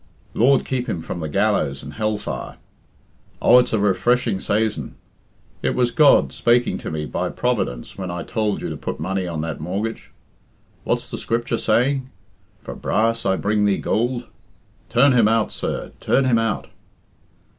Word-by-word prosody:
Lord 135 Hz, +4 st, +3 dB
keep 125 Hz, -1 st, -2 dB
him 85 Hz, -6 st, -3 dB
from 85 Hz, -, -5 dB
the 80 Hz, -2 st, -4 dB
gallows 70 Hz, -1 st, 0 dB
and -, -, -8 dB
hell 110 Hz, -1 st, -1 dB
fire! -, -, -6 dB, 0.8 s
Oh, 125 Hz, -, +7 dB
it's 125 Hz, -, +1 dB
a 110 Hz, -, +2 dB
refreshing 105 Hz, +2 st, +1 dB
saison. 105 Hz, +2 st, -1 dB, 0.7 s
It -, -, 0 dB
was 120 Hz, -1 st, +2 dB
God 145 Hz, +2 st, +5 dB
spaking 120 Hz, +1 st, +2 dB
to -, -, -5 dB
me 75 Hz, -1 st, -3 dB
by -, -, -2 dB
Providence 100 Hz, -, -2 dB
when 95 Hz, -1 st, -4 dB
I 85 Hz, -1 st, -4 dB
tould 110 Hz, -2 st, -1 dB
you -, -, -3 dB
to -, -, -5 dB
put -, -, -5 dB
money 95 Hz, -1 st, -2 dB
on 80 Hz, -3 st, -3 dB
that 80 Hz, -2 st, -4 dB
mortgage. 100 Hz, +8 st, -4 dB, 0.8 s
What's -, -, -1 dB
the -, -, -6 dB
Scripture 115 Hz, 0 st, -1 dB
saying, 130 Hz, +4 st, +1 dB, 0.5 s
'For -, -, -6 dB
brass 115 Hz, 0 st, 0 dB
I 95 Hz, -, +3 dB
bring 105 Hz, +1 st, +1 dB
thee 100 Hz, -1 st, +2 dB
goold'? 120 Hz, +2 st, -1 dB, 0.6 s
Turn 125 Hz, +4 st, +5 dB
him 115 Hz, -4 st, +5 dB
out, 115 Hz, 0 st, +2 dB
sir, -, -, -4 dB
turn 135 Hz, -, +2 dB
him 120 Hz, -3 st, +3 dB
out." 115 Hz, -2 st, -1 dB
110 Hz, 165 wpm, -22 LUFS, 95-120 Hz, 0.8 s, Oh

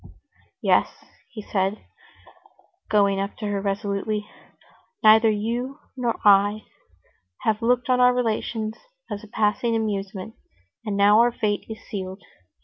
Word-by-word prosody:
"Yes," -, -, +4 dB, 0.4 s
he 215 Hz, -5 st, -9 dB
said, 195 Hz, +1 st, -2 dB, 1.0 s
going 200 Hz, -2 st, +3 dB
up 200 Hz, +1 st, -4 dB
to 215 Hz, -, -5 dB
her 205 Hz, -1 st, -1 dB
resolutely. 205 Hz, +1 st, -2 dB, 0.8 s
"Neither 220 Hz, +1 st, +7 dB
you 235 Hz, +6 st, -2 dB, 0.2 s
nor 240 Hz, -3 st, -2 dB
I 205 Hz, +1 st, +5 dB, 0.8 s
have 215 Hz, -1 st, 0 dB
looked 245 Hz, +1 st, +1 dB
on 255 Hz, -1 st, +2 dB
our 250 Hz, 0 st, +6 dB
relations 225 Hz, -2 st, -2 dB, 0.3 s
as 205 Hz, -, -5 dB
a -, -, -11 dB
passing 220 Hz, +2 st, 0 dB
amusement, 205 Hz, -1 st, -3 dB, 0.5 s
and 210 Hz, -3 st, -3 dB
now 205 Hz, +2 st, +6 dB
our 240 Hz, +1 st, +5 dB
fate 210 Hz, -3 st, -2 dB
is 220 Hz, -, -9 dB
sealed. 190 Hz, -1 st, -6 dB
215 Hz, 130 wpm, -24 LUFS, 200-225 Hz, 1.0 s, Neither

